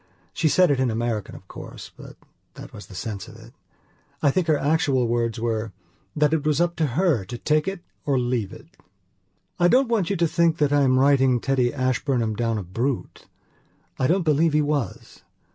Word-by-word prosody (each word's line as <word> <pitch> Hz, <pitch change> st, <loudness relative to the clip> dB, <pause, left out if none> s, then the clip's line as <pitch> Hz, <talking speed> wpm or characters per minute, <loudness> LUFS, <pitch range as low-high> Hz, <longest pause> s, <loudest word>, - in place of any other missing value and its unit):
She 155 Hz, -, +1 dB
said 180 Hz, 0 st, +4 dB
it 135 Hz, -, +1 dB
in 130 Hz, -1 st, +1 dB
American 115 Hz, -2 st, -3 dB
of -, -, -14 dB
course, -, -, -10 dB
but -, -, -12 dB, 0.4 s
that -, -, -11 dB
was 105 Hz, -, -10 dB
the 95 Hz, -, -12 dB
sense 100 Hz, 0 st, -5 dB
of 115 Hz, -, -13 dB
it. 115 Hz, +1 st, -15 dB, 0.7 s
I 140 Hz, -, +4 dB
think 180 Hz, +3 st, 0 dB
her 155 Hz, -2 st, +3 dB
actual 140 Hz, -4 st, +1 dB
words 115 Hz, 0 st, -1 dB
were: 110 Hz, -2 st, -2 dB, 0.4 s
'That 150 Hz, 0 st, +2 dB
it 160 Hz, -3 st, 0 dB
was 150 Hz, -1 st, +1 dB
up 170 Hz, 0 st, +1 dB
to 160 Hz, -2 st, +1 dB
her 165 Hz, -, +2 dB
to 120 Hz, -, -7 dB
take 155 Hz, +5 st, 0 dB
it 195 Hz, -2 st, -4 dB, 0.2 s
or 140 Hz, -2 st, +1 dB
leave 120 Hz, -5 st, -1 dB
it....'" -, -, -14 dB, 0.8 s
I 175 Hz, -, +5 dB
don't 255 Hz, +5 st, +3 dB
want 215 Hz, -7 st, +1 dB
you 200 Hz, -, 0 dB
to 170 Hz, -2 st, +2 dB
think 165 Hz, 0 st, +2 dB
that 145 Hz, -2 st, +1 dB
I 145 Hz, -, +4 dB
am 130 Hz, -2 st, +3 dB
writing 135 Hz, -2 st, +4 dB
Teddy 125 Hz, -1 st, +1 dB
Ashburnham 130 Hz, -4 st, -1 dB
down 115 Hz, 0 st, -1 dB
a 105 Hz, -, -4 dB
brute. 120 Hz, +9 st, -4 dB, 0.7 s
I 130 Hz, -, +2 dB
don't 180 Hz, +4 st, +2 dB
believe 155 Hz, 0 st, +2 dB
he 150 Hz, -, +3 dB
was. 145 Hz, -8 st, -3 dB
135 Hz, 200 wpm, -23 LUFS, 115-155 Hz, 0.8 s, I